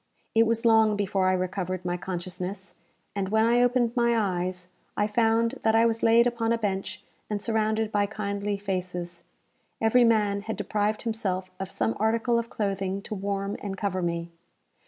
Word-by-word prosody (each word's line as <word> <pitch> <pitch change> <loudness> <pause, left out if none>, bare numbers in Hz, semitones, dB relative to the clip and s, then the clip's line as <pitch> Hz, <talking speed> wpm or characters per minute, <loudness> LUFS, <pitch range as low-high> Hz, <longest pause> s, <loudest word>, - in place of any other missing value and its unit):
It 225 0 +4
was 230 +1 0
long 220 -2 +5
before 195 -2 0
I 185 - +3
recovered 185 0 -2
my 175 0 0
consciousness, 185 +2 -5 0.4
and, 195 -2 -1
when 220 +1 +3
I 240 +1 +4
opened 245 -1 +2
my 235 -1 +3
eyes, 180 -3 -2 0.2
I 205 - +3
found 230 +3 +1
that 220 0 +3
I 225 +1 +5
was 230 -1 0
laid 230 +1 +5
upon 235 -2 0
a 230 - +2
bench 190 -3 -3 0.3
and 210 -1 -1
surrounded 220 0 0
by 205 -1 +2
kindly 200 -1 -3
faces. 180 -3 -4 0.5
Every 225 +2 +4
man 210 -3 +2
had 220 +2 -5
deprived 210 0 -1
himself 190 -5 -2
of 190 -1 -4
some 110 -8 -1
article 230 +2 +2
of 235 0 -5
clothing 195 -1 -2
to - - -6
warm 200 0 -2
and 195 -2 -5
cover 195 -2 -1
me. 170 -1 -2
205 Hz, 175 wpm, -27 LUFS, 190-225 Hz, 0.5 s, long